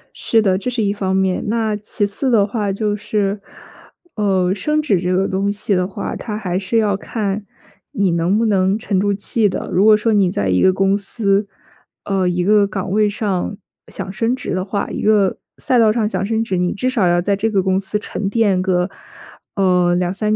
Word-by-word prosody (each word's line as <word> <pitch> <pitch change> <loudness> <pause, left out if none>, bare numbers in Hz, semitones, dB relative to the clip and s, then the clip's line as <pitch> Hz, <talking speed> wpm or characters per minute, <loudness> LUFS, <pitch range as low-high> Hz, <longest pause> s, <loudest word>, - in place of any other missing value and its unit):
是 225 - +2
的， 190 -3 +2
这 250 - -3
是 230 -3 -1
一 200 - +1
方 190 -2 -1
面， 190 -1 0
那 220 -1 0
其 210 0 -2
次 205 +7 -2
的 215 -5 +4
话 205 -2 -2
就 210 +1 -1
是， 205 -1 -2 0.7
呃， 190 -4 +1
升 300 +10 0
职 240 - +1
这 180 +1 0
个 190 +1 +1
东 195 +1 -1
西 205 0 -1
的 180 0 +1
话， 195 - -5
它 210 -2 -5
还 185 -4 -2
是 200 +4 -1
要 210 -3 +2
看 205 -1 -3 0.5
你 195 -3 +1
能 170 +4 +1
不 230 - +1
能 195 -1 +2
沉 200 -3 -1
住 205 +1 +1
气 205 +2 0
的， - - -4
如 190 - +3
果 215 -1 +6
说 220 +1 0
你 200 -3 +3
在 100 - -1
一 90 - +2
个 190 - +5
公 195 +1 +1
司， 200 0 0 0.6
呃， 195 -2 0
一 180 0 -1
个 205 +1 +4
岗 195 -2 -4
位 210 +1 +3
上 205 -2 -2 0.3
想 190 - -7
升 230 +5 0
职 260 - -5
的 185 0 -1
话， 200 +1 -3
一 - - -4
个 210 -3 +2 0.2
赛 250 - +1
道 220 -2 +5
上 215 -1 0
想 210 - -2
升 220 +2 0
职， 190 -5 -2
你 180 0 0
至 255 +5 -1
少 215 -8 +2
要 175 0 +3
在 200 +3 +1
这 220 +3 -1
个 195 -3 +1
公 190 0 +1
司 200 +2 -3
沉 205 -1 -4
淀 200 -4 +2
个， 185 0 0 0.6
呃， 180 -2 +2
2-3 195 +4 0
200 Hz, 225 characters per minute, -18 LUFS, 190-215 Hz, 0.7 s, 果